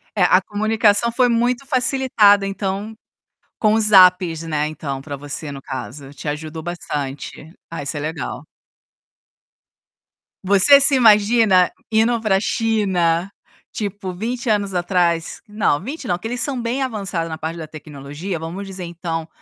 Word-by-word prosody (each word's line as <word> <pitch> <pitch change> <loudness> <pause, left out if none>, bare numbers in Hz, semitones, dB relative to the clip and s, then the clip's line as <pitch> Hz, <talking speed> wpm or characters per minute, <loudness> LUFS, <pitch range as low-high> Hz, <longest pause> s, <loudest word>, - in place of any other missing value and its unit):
É, 195 - +2
a 185 +1 +4
comunicação 215 +2 +1
foi 245 +1 +2
muito 240 +3 0
facilitada, 250 -6 +3
então, 195 +2 -4 0.6
com 215 -1 +2
os 215 -1 +2
apps, 180 -4 +5
né, 155 -2 -2
então, 140 -3 -6
para 140 0 -6
você, 145 +1 -6
no 135 - -8
caso, 135 +1 -8
te 145 +2 -7
ajudou 155 +2 -5
bastante. 150 -2 -6 0.2
Ah, 165 -3 -6
isso 145 +2 -4
é - - -3
legal. 155 0 -5 2.0
Você 200 +9 +6
se 275 0 +6
imagina 210 -4 +4 0.2
indo 225 +2 +2
para 215 -3 +1
a - - 0
China, 195 -5 0 0.4
tipo, 200 -3 -5
20 235 +5 -4
anos 205 -2 0
atrás? 175 -2 0
Não, 210 -8 0
20 270 - -7
não, 175 - +1
porque 180 +6 -6
eles 245 +2 -4
são 265 -4 -2
bem 240 +4 -2
avançados 195 -9 -3
na 160 - -5
parte 160 +2 -5
da 160 -2 -7
tecnologia, 150 +4 -7
vamos 175 +5 -6
dizer 190 -1 -7
então, 165 -1 -5
190 Hz, 150 wpm, -20 LUFS, 160-220 Hz, 2.0 s, Você